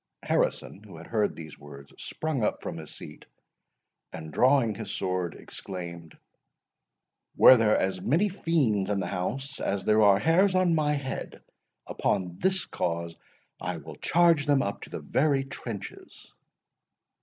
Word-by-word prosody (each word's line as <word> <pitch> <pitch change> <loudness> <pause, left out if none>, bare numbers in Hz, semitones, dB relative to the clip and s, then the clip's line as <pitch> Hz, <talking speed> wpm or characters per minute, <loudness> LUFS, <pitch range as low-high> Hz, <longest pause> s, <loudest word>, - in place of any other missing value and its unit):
Harrison, - - -1
who - - -13
had - - -11
heard 105 -3 0
these 80 -2 -10
words, 70 -1 -13
sprung 155 -5 -3 0.2
from - - -6
his - - -8
seat, - - -10 0.9
and 80 -1 -8
drawing 130 -3 +3
his 105 0 -7
sword, 90 -4 -2
exclaimed, 85 -4 -9 1.2
"Were 130 - +9
there 110 -3 +3
as 95 -1 -1
many 165 - +2
fiends 140 - 0
in 100 -1 0
the 95 - -2
house 135 +11 -3
as 100 -1 -2
there 110 0 +3
are 100 -2 +6
hairs 185 - +3
on 185 -2 +3
my 150 -2 +2
head, 140 -2 -5 0.4
upon 90 -2 -2
this 190 0 +1
cause 85 0 -3 0.5
I - - -3
will - - -10
charge 170 -4 +3
them 140 -2 +3
up 100 - -4
to - - -9
their - - -6
very 140 -1 +1
trenches!" 115 -6 -9
110 Hz, 145 wpm, -27 LUFS, 90-150 Hz, 1.2 s, Were